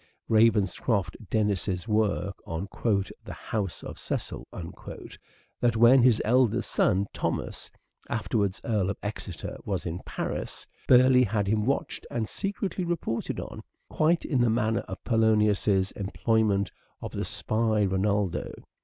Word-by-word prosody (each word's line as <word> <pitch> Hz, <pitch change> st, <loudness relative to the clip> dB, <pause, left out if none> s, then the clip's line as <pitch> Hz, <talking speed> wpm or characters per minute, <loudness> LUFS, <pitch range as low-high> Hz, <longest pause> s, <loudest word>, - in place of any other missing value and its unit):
Ravenscroft 110 Hz, -2 st, +2 dB
Dennis's 100 Hz, -3 st, 0 dB
work 105 Hz, -2 st, +1 dB
on 85 Hz, +4 st, -3 dB, 0.3 s
" 100 Hz, -1 st, -4 dB
The -, -, -6 dB
House 100 Hz, -5 st, -4 dB
of -, -, -8 dB
Cecil," -, -, -4 dB
that 110 Hz, +6 st, -5 dB
when 120 Hz, +3 st, +7 dB
his 120 Hz, -3 st, +5 dB
eldest 125 Hz, 0 st, +2 dB
son, 95 Hz, +2 st, +2 dB
Thomas, -, -, -3 dB, 0.4 s
afterwards 105 Hz, -4 st, 0 dB
Earl 105 Hz, -5 st, +1 dB
of 100 Hz, -, -3 dB
Exeter, 100 Hz, -4 st, -5 dB
was 95 Hz, -3 st, -3 dB
in 85 Hz, +1 st, -3 dB
Paris, -, -, -4 dB, 0.2 s
Burleigh 125 Hz, 0 st, +6 dB
had 105 Hz, -1 st, +1 dB
him 105 Hz, +2 st, +1 dB
watched 140 Hz, -, -1 dB
and 115 Hz, -2 st, -2 dB
secretly 195 Hz, -, -3 dB
reported 170 Hz, -10 st, -2 dB
on, -, -, -7 dB, 0.3 s
quite 160 Hz, +2 st, +2 dB
in 130 Hz, -5 st, +1 dB
the 120 Hz, -, +4 dB
manner 110 Hz, 0 st, +1 dB
of -, -, -7 dB
Polonius's 105 Hz, -4 st, +3 dB
employment 100 Hz, 0 st, +1 dB, 0.3 s
of -, -, -6 dB
the -, -, -3 dB
spy 110 Hz, -1 st, +1 dB
Reynaldo. 95 Hz, 0 st, 0 dB
110 Hz, 130 wpm, -27 LUFS, 100-115 Hz, 0.4 s, when